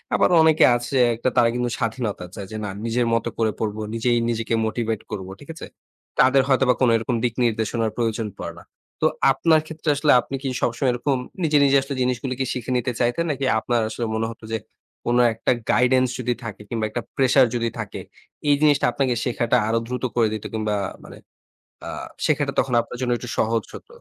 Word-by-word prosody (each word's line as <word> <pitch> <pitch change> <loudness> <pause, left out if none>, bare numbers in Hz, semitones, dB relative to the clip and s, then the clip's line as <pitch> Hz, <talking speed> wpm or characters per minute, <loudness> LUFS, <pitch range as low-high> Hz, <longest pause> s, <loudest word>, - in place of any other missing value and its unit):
আবার - - +3
অনেকে 160 -1 +5
আছে 120 +3 -3 0.2
একটা 120 +3 0
তারা 115 - +5
কিন্তু 125 0 0
স্বাধীনতা 115 -5 -3
চায়। 100 - -6
যে - - -6
না - - -3 0.2
নিজের 120 +1 +1
মত 115 -1 +1
করে 110 -1 +1
পড়ব। 105 -1 -2 0.2
নিজেই, 120 +1 +1
নিজেকে 115 0 -2
মোটিভেট 110 -1 -2
করব। 95 -2 -5
ঠিক 145 - -14
আছে? - - -8 0.5
তাদের 135 +1 +6
হয়তোবা 130 -1 +4
কোন 125 - +5
এরকম 115 +2 -1
দিক 120 -2 +1
নির্দেশনার 115 -1 0
প্রয়োজন 115 -2 -1
পড়ে - - -6
না। - - -15 0.4
তো - - +3 0.3
আপনার 160 +4 +3
ক্ষেত্রে 160 0 -4
আসলে 150 +1 +3
আপনি 135 - -6
কি - - -2
সবসময় 125 +3 +1
এরকম 130 +3 0 0.3
নিজে, 155 -2 +3
নিজে 140 0 +5
আসলে 135 +1 -5
জিনিসগুলো 125 +1 -1
কি 130 - +1
শিখে 125 0 -4
নিতে 125 +1 -1
চাইতেন, 120 +8 +1
নাকি 140 -1 -2
আপনার 120 +1 0
আসলে 120 - -3
মনে 110 0 0
হত 115 - -13
যে 110 - 0 0.5
কোন 120 +1 +2 0.2
একটা 110 - 0 0.2
গাইডেন্স 130 +1 +3
যদি 125 0 0
থাকে 110 -3 -7
কিংবা 115 -2 -1
একটা 120 +3 -3
প্রেশার 130 0 +5
যদি 115 -1 0
থাকে, - - -5 0.5
এই 145 - +6
জিনিসটা 145 -2 +4
আপনাকে 130 -1 0
শেখাটা 120 0 +1
আরো 115 +1 +1
দ্রুত 125 0 -4
করে 115 -2 +3
দিত 110 - -5
কিংবা 110 -1 -1 0.3
মানে - - -12 0.7
আ - - -4 0.4
শেখাটা - - +1
তখন 130 - 0
আপনার 125 - -9
জন্য 125 -1 0
একটু 125 - -8
সহজ 115 0 +1
হত। - - -10
120 Hz, 195 wpm, -23 LUFS, 115-130 Hz, 0.7 s, তাদের